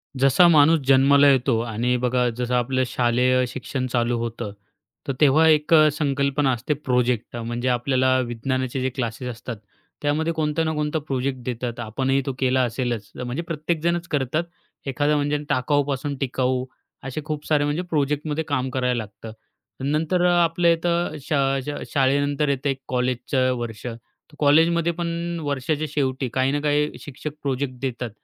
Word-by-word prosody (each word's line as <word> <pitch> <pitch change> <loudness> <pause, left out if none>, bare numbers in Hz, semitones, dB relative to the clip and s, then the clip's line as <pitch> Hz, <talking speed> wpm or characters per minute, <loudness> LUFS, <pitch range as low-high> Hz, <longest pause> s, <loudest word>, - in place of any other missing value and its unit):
जसा 135 +6 +5
माणूस 160 0 +5
जन्माला 140 +1 +6
येतो 130 -3 +2
आणि 120 +2 -1
बघा 125 0 +2
जसं 125 0 -2
आपलं 130 +1 +1
शालेय 125 +1 +2
शिक्षण 130 +1 -4
चालू 120 -1 0
होतं, 115 -2 -4 0.6
तर 135 - 0
तेव्हा 150 +2 +5
एक 155 0 +3
अ, 155 -1 +7
संकल्पना 140 -1 +1
असते, 125 +4 -1
प्रोजेक्ट 125 -5 -1
म्हणजे 120 +1 -3
आपल्याला 130 +1 +2
विज्ञानाचे 130 +2 -2
जे 130 - 0
क्लासेस 120 -1 -3
असतात, 120 0 -6 0.5
त्यामध्ये 155 +3 0
कोणता 155 0 0
ना 160 - 0
कोणता 150 +1 -1
प्रोजेक्ट 135 -1 -2
देतात, 120 -1 -4
आपणही 130 +4 0
तो 135 - -2
केला 130 0 +2
असेलच, 120 -3 -3
अ - - -3
म्हणजे 125 +6 -3
प्रत्येकजणच 170 +1 -2
करतात. 145 +2 0 0.4
एखादं, 145 +3 +1
म्हणजे 145 0 +1
टाकाऊपासून 140 +1 0
टिकाऊ 130 -1 -1 0.4
असे, 135 +3 -4
खूप 150 -1 -4
सारे 150 -2 +3
म्हणजे 145 +4 -1
प्रोजेक्टमध्ये 150 +1 -1
काम 130 -3 -1
करायला 125 -1 0
लागतं. 105 +2 -11 0.5
नंतर 155 +5 +1
अ, - - +5
आपलं 170 +1 +1
इथं 170 -1 -1
श 135 - -16 0.4
शा 145 0 -4
शाळेनंतर 145 +2 +2
येतं, 140 +1 0
एक 135 - -1
कॉलेजचं 130 +1 0
वर्ष. 115 -2 -6
तर 120 +5 -12
कॉलेजमध्ये 165 +3 +4
पण 170 0 -3
वर्षाच्या 145 +2 -1
शेवटी, 135 -2 -1
काही 130 +1 +1
ना 145 - 0
काही 150 0 +1
शिक्षक 145 +2 -7
प्रोजेक्ट 135 -1 -1
देतात 125 -2 -3
135 Hz, 155 wpm, -23 LUFS, 125-150 Hz, 0.6 s, अ